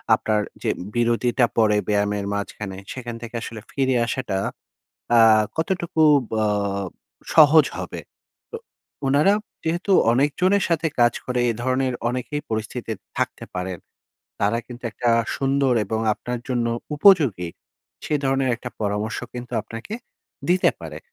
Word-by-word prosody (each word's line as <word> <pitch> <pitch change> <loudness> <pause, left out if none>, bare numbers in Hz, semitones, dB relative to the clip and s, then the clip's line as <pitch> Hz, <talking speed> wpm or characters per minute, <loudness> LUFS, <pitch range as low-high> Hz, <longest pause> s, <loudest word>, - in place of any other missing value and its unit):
আপনার 105 -1 0 0.2
যে - - +1 0.3
বিরতিটা 120 +1 +2
পড়ে 105 -2 +4
ব্যায়ামের 105 -1 +1
মাঝখানে, 100 -1 -5 0.2
সেখান 120 -2 -6
থেকে 120 0 -8
আসলে 115 -2 -7
ফিরে 130 -2 +1
আসাটা 120 -5 -2 0.8
আ - - +7 0.4
কতটুকু 170 -1 -1 0.3
বাব 100 -2 0 0.5
সহজ 155 0 +7
হবে। - - -5 0.5
তো - - -5 0.5
উনারা 145 +9 +4 0.3
যেহেতু 170 +5 -1 0.2
অনেকজনের 180 +10 +2
সাথে 165 -1 +1
কাজ 120 0 +5
করে, 125 -1 -1
এ - - -3
ধরনের 130 0 +1 0.2
অনেকেই 130 +4 -3
পরিস্থিতিতে 110 +1 -3 0.2
থাকতে - - -2
পারেন। 90 -1 -3 0.6
তারা 105 +3 +2
কিন্তু 120 0 -11
একটা 120 +1 0 0.3
সুন্দর 135 -1 +2
এবং 110 +2 -2
আপনার 125 +3 -5
জন্য 120 -2 0 0.3
উপযোগী, 145 - +5 0.6
সে - - -1
ধরনের 135 -1 +1
একটা 125 +2 -7
পরামর্শ 105 +1 -1 0.2
কিন্তু 125 -1 -7
আপনাকে 115 - -7 0.5
দিতে 180 +1 +4
পারে। - - -7
120 Hz, 130 wpm, -23 LUFS, 110-140 Hz, 0.8 s, আ